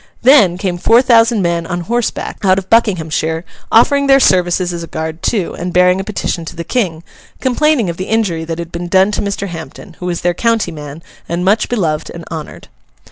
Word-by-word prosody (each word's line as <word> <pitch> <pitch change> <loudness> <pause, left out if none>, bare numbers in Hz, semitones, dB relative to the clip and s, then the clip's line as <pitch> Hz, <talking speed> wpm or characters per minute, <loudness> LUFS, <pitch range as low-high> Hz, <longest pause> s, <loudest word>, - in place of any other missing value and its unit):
Then, 235 -10 +5
came 180 -2 -3
four 230 +7 +4
thousand 230 -4 +4
men 170 -1 -1
on 175 -1 -3
horseback 235 +6 -3
out 190 -1 +4
of 190 -1 -5
Buckinghamshire, 165 -7 +1 0.3
offering 280 +5 +4
their 270 0 +6
services 180 -4 +2
as 170 - -5
a 165 - -7
guard 160 0 -5
too, 200 -7 -1
and 180 +1 -3
bearing 180 +1 +3
a - - -2
petition 190 -4 -3
to - - -8
the 170 - -5
King, 170 -6 -2 0.4
complaining 265 -2 +1
of 170 -1 -4
the 185 - -5
injury 200 -8 0
that 165 0 -4
had 170 0 -6
been 175 +1 -5
done 190 +3 +3
to - - -2
Mr. 200 0 -3
Hampden, 170 +2 -9
who 180 - -5
was 175 -1 -2
their 175 0 +1
county 230 -1 0
man 150 0 -9 0.3
and 170 +2 -2
much 210 +3 +2
beloved 165 -10 -1
and 170 -1 -9
honoured. 160 -2 -7
180 Hz, 205 wpm, -15 LUFS, 170-225 Hz, 0.4 s, their